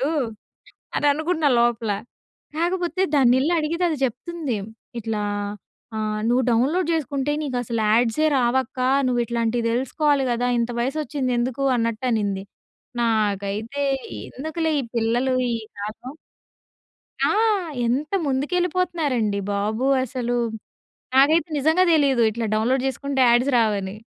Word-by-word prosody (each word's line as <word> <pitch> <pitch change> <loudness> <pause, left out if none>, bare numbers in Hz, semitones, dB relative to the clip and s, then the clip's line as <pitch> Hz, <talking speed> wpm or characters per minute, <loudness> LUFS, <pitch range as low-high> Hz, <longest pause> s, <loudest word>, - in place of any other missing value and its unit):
అనుకుంటూ 275 - +1 0.9
అని 295 - +1
అనుకున్నా 315 0 0
లోపల. 235 -2 +1 0.7
కాకపోతే 350 +1 0
దాన్నెళ్లి 265 +3 +4
అడిగితే, 335 +4 -2
అది 310 - -1
చెప్తుంది 275 +1 -4 0.4
ఇట్లా 220 -1 -2 0.7
ఆహ్, 215 0 -2
"నువ్వు 250 +2 +3
డౌన్‌లోడ్ 280 +10 +2
చేసుకుంటే, 290 -2 -1
నీకసలు 245 -5 -2
యాడ్సే 235 +6 +3
రావక్క. 255 +1 0 0.3
నువ్వు 245 -1 +1
ఇట్లాంటివి 235 0 -1
తెలుసుకోవాలి 275 +3 +1
కదా! 240 +1 0
ఇంత 235 +1 0
వయసు 270 +6 -1
వచ్చింది 270 -4 -2
ఎందుకు?" 255 +3 -1
అన్నట్టునింది. 225 -4 -1 0.6
నాకైతే, 215 +3 -1 0.5
ఎందుకులే 315 +3 -2
ఈ - - -3
పిల్లలు 240 +3 +1 0.2
ఈ - - 0 0.3
కాలం. 215 +6 -7 1.1
ఆ! - - +2 0.6
ఎంత 270 +8 -1 0.2
ముందుకెళ్ళిపోతున్నారండి 295 - 0
బాబు 215 +5 -1 0.2
అసలు. 245 -1 -2 0.8
నాకైతే, 310 +6 +4
నిజంగా 320 +6 +3
తెలీదు. 275 -6 +3
ఇట్లా 225 +1 -3
డౌన్‌లోడ్ 250 +4 +1
చేసుకుంటే 270 +1 -2
యాడ్స్ 240 +4 +4
రావని. 200 -3 0
255 Hz, 110 wpm, -23 LUFS, 230-295 Hz, 1.1 s, దాన్నెళ్లి